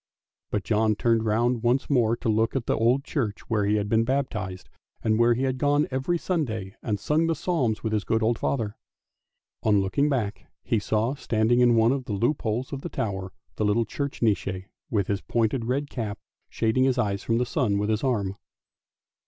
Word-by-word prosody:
" - - -67
but 105 - -1
John 110 0 +2
turned 115 0 +1
round 115 +2 +1
once 120 +3 +1
more 120 -4 +2
to - - -5
look 110 +2 +1
at 130 -3 -1
the - - +1
old 120 +5 +2
church 115 -9 -2
where 105 -2 +2
he 105 - +2
had 105 -1 0
been 110 +2 +3
baptised, 105 -8 -2 0.4
and 110 0 +2
where 120 0 +5
he 130 - -1
had 130 -1 -1
gone 145 +1 +2
every 135 +7 0
Sunday 120 - -2
and 105 -2 -2
sung 155 +7 +1
the 165 - +1
psalms 135 -10 -1
with 110 -1 -1
his 105 -2 +1
good 110 0 0
old 115 +1 +1
father. 115 -6 -1 0.9
On 105 -2 +3
looking 140 +10 +1
back 110 -7 -2 0.2
he 115 - +1
saw 110 +4 0
standing 120 -3 +1
in 120 -1 +5
one 115 +1 +4
of 135 -2 -2
the 110 - -4
loop 120 +9 0
holes 120 +5 -2
of 135 - -4
the - - -5
tower 95 -3 -3 0.3
the - - 0
little 105 +3 +2
church 140 +3 -4
Nisse 95 -4 0 0.2
with 100 -4 +1
his 100 0 -2
pointed 115 +1 0
red 135 +4 -1
cap, 110 -7 -4 0.3
shading 115 +4 +1
his 130 -1 +2
eyes 100 -5 0
from 115 - 0
the 125 - +1
sun 125 - 0
with 105 +2 0
his 110 +3 -1
arm. 100 -7 0
115 Hz, 210 wpm, -26 LUFS, 105-130 Hz, 0.9 s, where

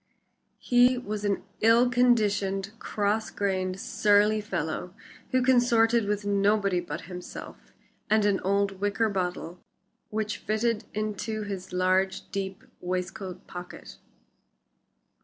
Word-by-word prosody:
He 245 +1 +4
was 215 -4 -4
an 200 -1 0 0.2
ill 230 +3 +5
conditioned 205 -5 +2
cross 210 +1 -1
grained, 190 -2 -2
surly 210 +1 +3
fellow, 175 -2 -4 0.3
who 255 0 +2
consorted 235 -3 +4
with 205 0 -1
nobody 200 -2 +2
but 175 - -5
himself 180 0 -9 0.4
and 215 -1 +4
an 200 -2 +2
old 195 0 0
wicker 205 +3 +1
bottle 180 -2 -3 0.5
which 215 -1 -2
fitted 220 +1 -1
into 215 +1 -3
his 195 -2 -6
large, 185 +1 +1
deep 195 -2 -4 0.2
waistcoat 185 +1 -4
pocket. 180 0 -10
205 Hz, 110 wpm, -27 LUFS, 190-220 Hz, 0.5 s, ill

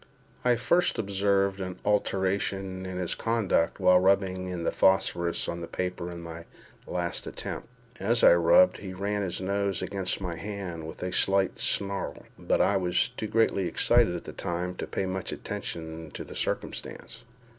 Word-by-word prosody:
I 125 -1 +4
first 175 +10 +2
observed 100 -1 +1
an 90 -1 -4
alteration 95 -2 0
in 95 -1 -5
his 90 -2 -1
conduct 110 -8 +1
while 90 -1 +6
rubbing 95 -1 +2
in 90 -2 -4
the - - +1
phosphorus 85 -2 +2
on 85 0 -3
the 85 - -5
paper 90 -1 -3
in 85 -1 -7
my 85 0 -8 0.4
last - - -2
attempt. - - -5 0.3
As 115 +5 +1
I - - +9
rubbed, 85 +1 +5
he 95 -2 -7
ran 100 +2 -1
his 95 -3 -3
nose 100 -1 -1
against 95 -2 -2
my 90 -4 -4
hand 90 -4 -5
with 80 - -8
a 90 - -2
slight 95 0 +2
snarl; 100 0 -2
but - - +1
I 100 - +4
was 90 +3 +1
too 125 -3 -5
greatly 105 -4 +2
excited - - +3
at - - -5
the - - -8
time 90 +1 -3
to - - -4
pay 95 - -2
much 95 0 -3
attention 80 -1 -5
to - - -5
the - - -10
circumstance. 115 +2 -4
95 Hz, 170 wpm, -28 LUFS, 90-100 Hz, 0.4 s, I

